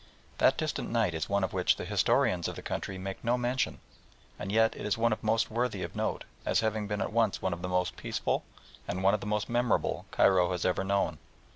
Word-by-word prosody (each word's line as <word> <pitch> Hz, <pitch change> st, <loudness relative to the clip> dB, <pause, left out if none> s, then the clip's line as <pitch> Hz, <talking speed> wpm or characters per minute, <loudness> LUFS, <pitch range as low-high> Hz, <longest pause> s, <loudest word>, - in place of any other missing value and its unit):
That -, -, +5 dB
distant -, -, -2 dB
night 85 Hz, -, +1 dB
is 80 Hz, -1 st, -3 dB
one 100 Hz, 0 st, +1 dB
of 95 Hz, -, -1 dB
which 90 Hz, -1 st, +3 dB
the -, -, -6 dB
historians 90 Hz, -2 st, +2 dB
of -, -, -5 dB
the -, -, -8 dB
country 95 Hz, -, -4 dB
make 95 Hz, +1 st, -6 dB
no 120 Hz, +1 st, +2 dB
mention, 125 Hz, +1 st, -1 dB, 0.6 s
and 95 Hz, -, -4 dB
yet 110 Hz, +1 st, +3 dB
it -, -, -7 dB
is 105 Hz, 0 st, 0 dB
one 115 Hz, -1 st, +2 dB
most 110 Hz, +1 st, +1 dB
worthy 120 Hz, +1 st, -1 dB
of -, -, -6 dB
note, -, -, -1 dB, 0.2 s
as -, -, +2 dB
having 110 Hz, -1 st, -1 dB
been 105 Hz, 0 st, -2 dB
at 95 Hz, -, -2 dB
once 115 Hz, -3 st, +2 dB
one 95 Hz, -, -1 dB
of 85 Hz, -, -6 dB
the 90 Hz, -, -3 dB
most 90 Hz, 0 st, 0 dB
peaceful -, -, -1 dB, 0.4 s
and 95 Hz, +1 st, -3 dB
one 95 Hz, +1 st, +5 dB
of 105 Hz, -, +1 dB
the 105 Hz, -, -6 dB
most 105 Hz, 0 st, 0 dB
memorable 120 Hz, 0 st, 0 dB
Cairo 95 Hz, -2 st, +4 dB
has 90 Hz, -, -2 dB
ever 90 Hz, +1 st, +1 dB
known. 100 Hz, +1 st, 0 dB
100 Hz, 230 wpm, -30 LUFS, 95-115 Hz, 0.6 s, That